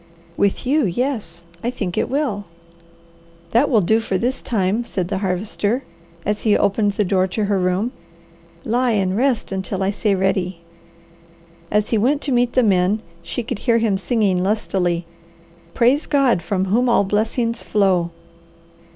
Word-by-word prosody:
"With 200 +6 0
you, 280 -1 +2
yes, 200 -5 -3 0.2
I 240 - 0
think 200 -8 -4
it - - 0
will." 260 -8 -1 1.1
"That 250 +6 +3
will 225 -6 +4
do 220 +5 +3
for 195 -4 -1
this 250 +7 -1
time," 210 +1 0
said 185 -6 -3
the 195 -2 -1
Harvester, 205 +5 -1 0.4
as 210 +1 -1
he 215 -2 +3
opened 205 +1 +1
the 210 - +1
door 185 0 +2
to 210 +3 -2
her 200 -1 +1
room. 185 +6 0 0.7
"Lie 240 +1 +1
and 190 -3 +1
rest 250 -1 0
until 190 0 -3
I 195 - +1
say 205 0 0
ready." 185 -2 -1 1.1
As 210 0 +1
he 225 - +3
went 280 +7 +2
to 285 - -2
meet 245 -1 +2
the 255 - +4
men, 195 +1 +2 0.2
she 245 - -4
could 235 -2 -4
hear 235 0 +2
him 225 -3 +1
singing 195 -2 +1
lustily, 185 -4 0 0.7
"Praise 255 +6 +3
God 270 - +3
from 190 +2 -1
whom 235 +6 +2
all 235 - +4
blessings 225 +4 0
flow." 190 -5 +1
210 Hz, 160 wpm, -20 LUFS, 190-240 Hz, 1.1 s, will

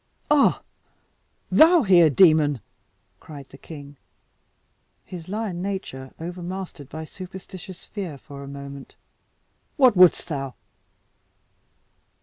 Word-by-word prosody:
"Ah! 295 -2 +4 0.9
thou 325 0 +6
here, 175 -6 +6
demon!" 150 -3 +5 0.6
cried 145 -3 -11
the 135 - -13
king, 145 -3 -11 1.1
his 175 -1 -9
lion 205 -4 -3
nature 185 -9 -5
overmastered 175 -3 -6
by 160 +1 -7
superstitious 185 +1 -10
fear 185 -9 -6
for 140 +1 -11
a 140 - -9
moment. 140 0 -9 0.8
"What 255 -6 +6
wouldst 180 -1 +6
thou?" 135 -4 -4
170 Hz, 100 wpm, -24 LUFS, 140-190 Hz, 1.1 s, thou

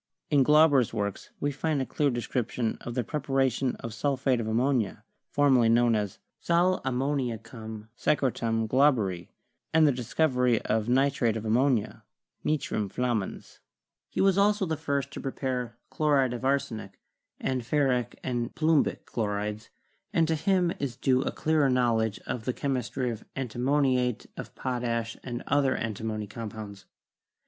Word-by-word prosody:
In 145 -2 +5
Glauber's 150 -3 +5
works 100 -1 -3
we 145 - 0
find 150 +1 -1
a 130 - 0
clear 145 +2 +1
description 120 -1 -2
of 120 - -6
the 125 - 0
preparation 135 -2 0
of 115 - -7
sulphate 135 -2 +1
of 110 - -3
ammonia, 115 -2 0 0.3
formerly 130 -5 +4
known 120 0 +4
as 105 -3 -1 0.2
"sal 175 +2 +2
ammoniacum 120 -5 -3
secre 135 -3 +1
tum 115 -1 -1
Glauberi," 110 - +2 0.4
and 160 0 +5
the 145 - +5
discovery 125 -1 +1
of 110 +1 0
nitrate 130 -3 +2
of 110 - -6
ammonia, 120 0 +1 0.4
'nitrum 135 -9 -1
flammans.' 120 -3 -3 0.5
He - - -1
was 195 0 +4
also 205 0 +3
the 160 -2 -1
first 140 -3 -2
to - - -7
prepare 125 -3 -3
chlo 150 -2 +2
ride 130 -3 +2
of 125 - -6
arsenic, 115 -8 -1 0.4
and 130 -1 -1
ferric 125 -2 0
and 120 -2 -2
plumbic 160 -1 +2
chlorides, 105 0 -3 0.4
and 165 -5 +2
to 165 - +1
him 175 +2 +2
is 135 -4 -3
due 130 -1 +2
a - - -1
clearer 155 -3 +2
knowledge 115 -4 +2
of 115 -3 -4
the 125 - 0
chemistry 130 -2 -2
of 115 -1 -7
anti 125 -3 -4
moniate 130 -3 +1
of - - -8
potash 120 -3 -2
and 120 -1 -5
other 140 -2 +2
antimony 110 -1 -3
compounds. 105 -1 -8
125 Hz, 150 wpm, -28 LUFS, 115-140 Hz, 0.5 s, In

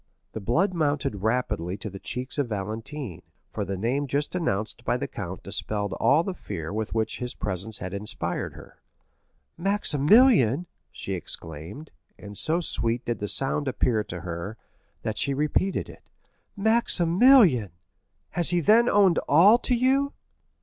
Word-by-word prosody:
The - - -4
blood 170 - +1
mounted 145 - 0
rapidly 105 -6 -1
to 100 - -7
the 95 -1 -8
cheeks 125 +7 -3
of 135 -4 0
Valentine, 110 - -5 0.3
for 105 - -3
the 95 0 -4
name 130 +8 -1
just 140 +3 -1
announced 110 - -2
by - - 0
the - - -4
count - - -7
dispelled 105 -2 -2
all 145 +10 +3
the 190 - -3
fear 95 - -6
with 110 +1 -3
which 110 -1 -1
his 125 0 -4
presence 105 +2 -3
had 95 0 -6
inspired 100 -1 -3
her. - - -15 0.8
"Maximilian!" 180 - +4 0.3
she - - -6
exclaimed, 80 - -5 0.3
and 100 0 -10
so 165 - 0
sweet 120 -6 -1
did 120 - -2
the 105 - -3
sound 135 +5 0
appear 120 -4 +1
to 90 -4 -7
her, 85 +5 -6 0.5
that 110 - -3
she 140 - 0
repeated 150 +6 0
it—"Maximilian!—has 175 - +1
he 175 - +2
then 225 +8 +5
owned 195 -5 +4
all 195 +10 +7
to 250 - +1
you?" 270 +3 +2
125 Hz, 145 wpm, -26 LUFS, 105-175 Hz, 0.8 s, all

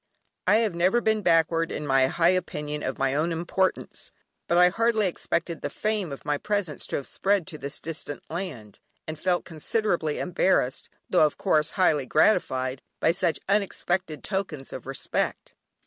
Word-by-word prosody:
I 205 - +6
have 220 -3 +2
never 180 +7 +3
been 220 -2 +1
backward 165 -2 +2
in 150 - -4
my 135 -2 +4
high 170 +4 +3
opinion 150 -5 -2
of 130 - -3
my 135 0 +1
own 155 +4 +1
importance, 175 +3 -2 0.4
but 170 - +2
I 180 0 +7
hardly 225 +1 +2
expected 170 -2 -2
the - - -2
fame 210 -6 -2
of 140 - -8
my 145 -1 0
presence 205 -7 -2
to - - -3
have 140 - -3
spread 195 -3 +1
to 160 -5 -7
this 140 +1 -5
distant 155 -2 -6
land, 140 - -6 0.3
and 155 -1 -5
felt 180 0 0
considerably 165 -1 -1
embarrassed, 175 -7 +1 0.2
though, 155 - +5
of 150 - -8
course, 155 +1 +1
highly 150 -8 +2
gratified, 130 -7 +2 0.2
by 160 - +4
such 170 -3 0
unexpected 190 -5 -1
tokens 190 -9 -4
of - - -8
respect. - - -2
170 Hz, 165 wpm, -26 LUFS, 150-190 Hz, 0.4 s, I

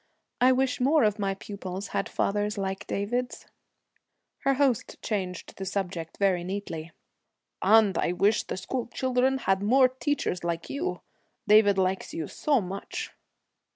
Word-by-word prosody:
'I 255 +1 +6
wish 255 0 0
more 285 +4 +4
of 210 0 +2
my 195 -1 0
pupils 195 -1 -6
had - - -2
fathers 205 +1 -1
like 195 -1 -3
David's.' 245 +5 -2 0.9
Her 275 0 +2
host 265 -5 +1
changed 185 -5 -3
the 195 - -5
subject 180 -4 -4
very 190 -3 +2
neatly. 175 -4 -5 0.7
'And 210 -1 +5
I 175 - +1
wish 205 +4 +3
the - - -5
school 245 +6 -3
children 260 +1 +1
had 195 -7 +1
more 255 +5 +5
teachers 260 - -2
like 170 -1 -3
you. 335 +7 -3 0.5
David 205 -1 +6
likes 190 0 0
you 160 -3 -3
so 290 -3 +1
much.' 195 +1 -5
205 Hz, 145 wpm, -27 LUFS, 190-250 Hz, 0.9 s, I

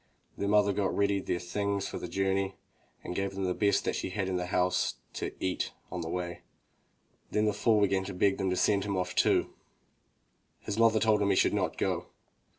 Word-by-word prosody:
The 100 - -2
mother 100 -1 +4
got 95 -1 -1
ready 100 -1 +2
their 90 - -2
things 100 +3 -2
for - - -5
the - - -5
journey, 95 0 0 0.5
and - - -5
gave 95 +1 -2
them 95 - -3
the 90 -1 +1
best 100 +2 +1
she - - -3
had 95 0 -2
in 95 - -1
the 90 0 -2
house 90 0 +1 0.2
to - - -3
eat 95 -1 -2 0.2
on 90 - -3
the 80 - -4
way. 85 0 -4 0.9
Then 105 0 +1
the 105 - +2
fool 110 -1 +3
began 95 -1 +2
to 100 - -5
beg 95 +1 +2
them 95 -1 0
to 90 - 0
send 100 +1 +2
him 100 -2 -2
off 90 -1 -2
too. - - +2 1.1
His 105 +1 -4
mother 115 -1 +5
told 110 -1 +3
him 100 - +2
he 100 - +3
should - - +3
not - - -1
go. - - -1
100 Hz, 210 wpm, -30 LUFS, 90-100 Hz, 1.1 s, mother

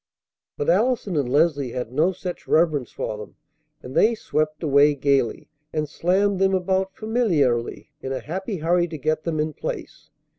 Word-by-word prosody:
But 445 0 -2
Allison 245 - +2
and 140 -5 0
Leslie 145 -3 +2
had 125 -2 -4
no 155 +8 +2
such 180 -1 -7
reverence 155 -6 +2
for 105 - -4
them; 105 - -10 0.5
and 125 - -8
they 230 +9 +4
swept 155 -5 -2
away 145 0 +4
gayly, 135 -4 +1 0.2
and 155 -1 -1
slammed 190 +5 +1
them 190 0 +3
about 190 +1 0
familiarly, 160 - 0
in 135 - -5
a 135 - -2
happy 190 +5 -4
hurry 175 +2 +2
to 160 -2 -6
get 155 +2 -1
them 160 -2 -1
in 155 0 -1
place. - - -6
155 Hz, 170 wpm, -23 LUFS, 140-190 Hz, 0.5 s, they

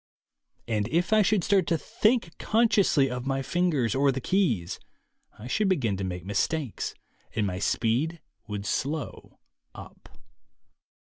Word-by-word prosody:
And 105 -3 0
if 175 - +1
I 215 - +6
should 205 -2 +2
start 195 0 +2
to 165 - +2
think 215 -1 0
con 230 +2 +3
sciously 185 -11 +3
of 125 +1 -4
my 135 0 -1
fingers 140 - +1
or 140 +1 +3
the 135 - -3
keys, 125 - 0 0.6
I 105 - -10
should 195 - +1
begin 125 - +1
to 95 - -4
make 90 -1 -4
mistakes 120 +6 -2 0.4
and 110 -2 +1
my 90 -2 -3
speed 130 - 0 0.3
would 105 -1 -5
slow 145 +6 -3 0.4
up. - - -12
135 Hz, 145 wpm, -27 LUFS, 110-180 Hz, 0.6 s, I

